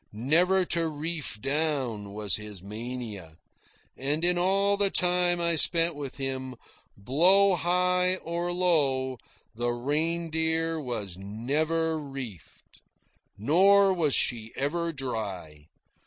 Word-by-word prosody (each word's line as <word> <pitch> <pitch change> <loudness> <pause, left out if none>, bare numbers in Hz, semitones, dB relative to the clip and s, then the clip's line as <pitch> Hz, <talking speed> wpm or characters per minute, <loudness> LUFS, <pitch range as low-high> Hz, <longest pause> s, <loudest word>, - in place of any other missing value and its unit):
Never 175 - +2
to 170 -1 +1
reef 155 -5 -4
down 135 -7 -2
was 105 -3 0
his 105 -3 -9
mania, 105 -6 -7 0.6
and 145 +5 -1
in 180 0 +3
all 195 +3 +2
the 200 -1 +2
time 180 -1 +2
I 170 -1 +1
spent 165 +1 +4
with 145 -2 -7
him, 130 -1 -4 0.4
blow 180 - +4
high 180 +1 +1
or 170 0 -4
low, 140 -8 +1 0.3
the 120 +2 -2
Reindeer 160 +5 -1
was 110 - -5
never 155 +11 -1
reefed. 135 - -10 0.6
Nor 190 - +4
was 160 -6 +1
she 115 -2 0
ever 170 +5 -2
dry. 100 - -6
150 Hz, 110 wpm, -27 LUFS, 120-175 Hz, 0.6 s, spent